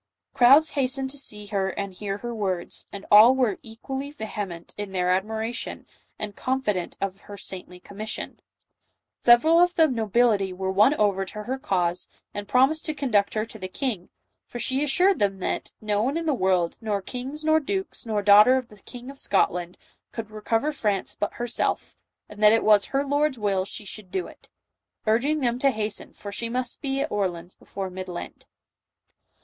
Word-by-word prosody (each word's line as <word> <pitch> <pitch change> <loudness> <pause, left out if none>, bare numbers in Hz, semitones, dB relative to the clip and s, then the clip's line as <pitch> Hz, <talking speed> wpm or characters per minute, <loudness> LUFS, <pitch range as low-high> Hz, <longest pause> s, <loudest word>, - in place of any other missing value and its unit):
Crowds 275 +5 +6
hastened 265 -1 -1
to 285 - -6
see 210 -6 -6
her 200 -2 -1
and 200 0 -4
hear 195 +1 -4
her 240 +3 -5
words, 190 -5 -3
and 200 -1 -8
all 220 +5 +9
were 245 -7 +1
equally 265 +5 -6
vehement 205 - -6
in 205 -2 -6
their 180 -1 +1
admiration, 220 +5 -2 0.3
and 210 -2 -3
confident 220 -9 -1
of 195 -1 -3
her 205 - -7
saintly 180 -2 -8
commission. 210 +4 -6 0.8
Several 310 +8 +6
of 355 0 +4
the 320 -1 +5
nobility 220 -5 +2
were 190 +1 -3
won 210 +9 +5
over 200 -5 +2
to 210 +2 -7
her 260 +4 -3
cause, 180 - -1 0.2
and 205 0 -5
promised 270 +7 +3
to 310 - -2
conduct 215 -9 +1
her 215 0 0
to 220 -1 -12
the 185 - -4
king, 205 -3 -3 0.4
for - - -7
she 260 +3 -1
assured 360 +7 +3
them 195 -1 +1
that 185 - -3
"no 210 -1 0
one 270 +7 0
in 335 - -3
the 310 - +2
world, 185 -7 +1
nor 210 -3 -1
kings, 265 +7 -6
nor 315 0 +5
dukes, 380 +6 -3
nor 210 -2 0
daughter 210 +5 +8
of 255 -2 -4
the 210 - -15
King 250 +1 -9
of 275 - -14
Scotland, 180 -2 0 0.3
could 225 -2 -6
recover 225 +6 0
France 210 -9 -1
but 205 - -2
her 240 - -4
self, 240 - -2 0.3
and 210 0 -11
that 210 0 +8
it 225 - +3
was 210 -2 +5
her 275 +1 -1
Lord's 285 -1 +1
will 200 -3 0
she 210 - -8
should 200 -1 -7
do 185 -1 -2
it," - - -15 0.6
urging 265 +8 +2
them 240 -1 0
to 275 - +4
hasten, 215 -4 -4
for 200 - -8
she 230 +3 -3
must 250 0 -3
be 275 -2 -1
at - - -2
Orleans 180 -3 -2
before 190 -2 -7
Mid 185 0 -6
Lent. 175 -1 -8
215 Hz, 190 wpm, -25 LUFS, 195-265 Hz, 0.8 s, all